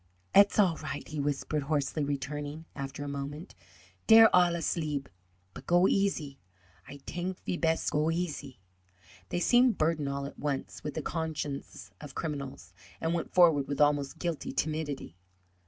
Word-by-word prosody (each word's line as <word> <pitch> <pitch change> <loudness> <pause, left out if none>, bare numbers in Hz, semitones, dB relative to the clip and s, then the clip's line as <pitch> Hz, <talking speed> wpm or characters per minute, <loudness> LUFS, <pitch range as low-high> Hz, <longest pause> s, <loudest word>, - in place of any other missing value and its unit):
"Et's 200 0 +6
all 185 -6 +4
right," 145 -2 -6
he 155 -1 -4
whispered, 145 +1 -1
hoarsely, 145 +1 -1
returning 145 +2 -4
after 140 0 -5
a - - -5
moment; 140 +3 -6 0.5
"dere 225 0 +9
all 175 -1 +5
asleeb. 155 -4 -2 0.5
But - - -11
go 175 +2 +5
easy; 160 -9 0 0.5
Ay 140 - -9
tank 180 +1 -4
ve - - -1
pest 165 -1 0
go 150 +2 +1
easy." 165 - -3 0.7
They - - -1
seemed 245 +5 +4
burdened 155 -2 +1
all 140 0 -3
at 140 - -9
once 145 -2 -3
with 150 -2 -5
the 155 - -3
consciences 155 -4 -4
of 150 - -10
criminals, 140 - -5 0.3
and 165 +1 -1
went 170 -2 -3
forward 160 -6 +5
with 140 - -3
almost 145 -2 +2
guilty 170 -3 -3
timidity. 150 - -3
150 Hz, 155 wpm, -30 LUFS, 140-170 Hz, 0.7 s, dere